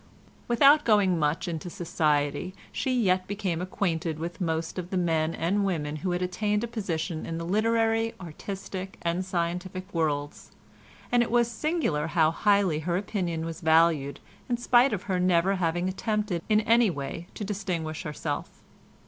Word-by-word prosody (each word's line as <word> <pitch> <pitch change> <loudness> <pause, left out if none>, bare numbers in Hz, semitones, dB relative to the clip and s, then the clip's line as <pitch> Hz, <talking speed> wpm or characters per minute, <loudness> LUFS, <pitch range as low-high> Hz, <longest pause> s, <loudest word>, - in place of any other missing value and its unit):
Without 275 +5 +6
going 200 -6 +3
much 150 +4 0
into 170 +1 -4
society 155 +1 0 0.2
she 260 - -1
yet 185 -4 +2
became 195 -4 -2
acquainted 170 -4 -1
with 170 +4 -6
most 165 +1 -2
of 175 -1 -6
the 190 - -1
men 165 -2 +1
and 195 +5 +1
women 155 -6 -1
who 180 +5 -3
had 180 0 0
attained 205 +4 0
a - - -1
position 175 -7 -3
in 165 - -4
the 165 - -4
literary, 225 +3 +1
artistic 190 +2 -7
and 170 +2 0
scientific 185 +1 -3
worlds, 145 -3 -2 0.6
and 245 0 +4
it 240 - 0
was 240 0 +2
singular 235 - 0
how 160 -1 +3
highly 200 -3 +2
her 170 +2 -1
opinion 180 -5 -2
was 165 -1 -6
valued 160 -3 +3 0.3
in 240 - +1
spite 245 +2 +4
of 195 -3 -2
her 185 -2 -1
never 180 +2 +3
having 175 0 0
attempted 205 -1 -1
in 215 0 +4
any 230 0 +4
way 165 +2 -5
to - - -5
distinguish 180 -6 -3
herself. 150 -1 -5
180 Hz, 160 wpm, -27 LUFS, 165-205 Hz, 0.6 s, Without